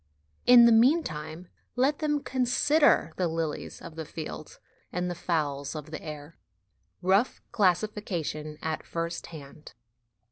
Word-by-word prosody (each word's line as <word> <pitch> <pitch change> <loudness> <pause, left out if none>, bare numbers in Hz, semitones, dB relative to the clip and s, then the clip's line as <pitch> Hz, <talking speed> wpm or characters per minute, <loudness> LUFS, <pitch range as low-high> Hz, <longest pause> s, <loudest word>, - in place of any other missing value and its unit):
In 245 -1 +9
the 235 - +6
meantime, 180 - +2 0.3
let 270 +4 +2
them 295 -2 0
consider 260 - +2
the 180 - +1
lilies 160 -2 -4
of 165 -2 -9
the 160 - -5
field 155 0 -8 0.3
and 180 0 -2
the - - -2
fowls 150 -5 -2
of 150 0 -7
the 160 - -6
air. 150 0 -9 0.6
Rough 195 +7 +2
Classification 180 -6 -1
at 160 -1 -2
First 165 0 -4
Hand. 150 -2 -12
170 Hz, 130 wpm, -28 LUFS, 155-235 Hz, 0.6 s, In